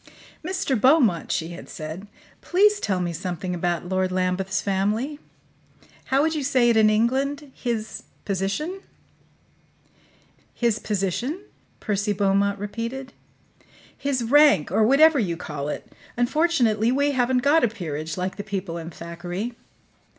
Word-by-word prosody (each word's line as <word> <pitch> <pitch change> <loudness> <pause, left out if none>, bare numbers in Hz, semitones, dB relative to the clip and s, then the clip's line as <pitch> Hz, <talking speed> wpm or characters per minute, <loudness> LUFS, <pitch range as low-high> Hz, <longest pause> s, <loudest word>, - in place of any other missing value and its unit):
"Mr. 370 -3 -1
Beaumont," 245 - +3
she 165 0 -1
had 175 +1 -10
said, 160 +4 -7 0.3
"please 410 +3 +3
tell 190 - -1
me 175 -1 -2
something 180 +1 -4
about 175 0 -2
Lord 185 0 0
Lambeth's 185 +1 0
family. 210 +9 -1 0.9
How 270 +2 +2
would 320 +1 +1
you 305 - -2
say 255 -3 +3
it - - +1
in 215 -1 +6
England 270 +6 0
his 230 -3 -4 0.2
position?" 200 - -2 1.7
"His 235 -3 +1
position?" 210 - -2 0.4
Percy 205 -1 -1
Beaumont 200 0 +1
repeated. 230 +6 -5 0.8
"His 270 -3 -1
rank, 285 - +5
or - - +2
whatever 285 +5 +6
you 175 -7 -1
call 150 -3 -5
it. - - -6 0.2
Unfortunately 245 -5 +2
we 285 +2 +2
haven't 250 -1 +1
got 305 +3 +4
a - - +5
PEERAGE, 160 -7 -5
like 185 +1 -3
the 205 - -4
people 190 -5 -4
in 165 0 -7
Thackeray." 175 +7 -6
215 Hz, 135 wpm, -24 LUFS, 185-270 Hz, 1.7 s, in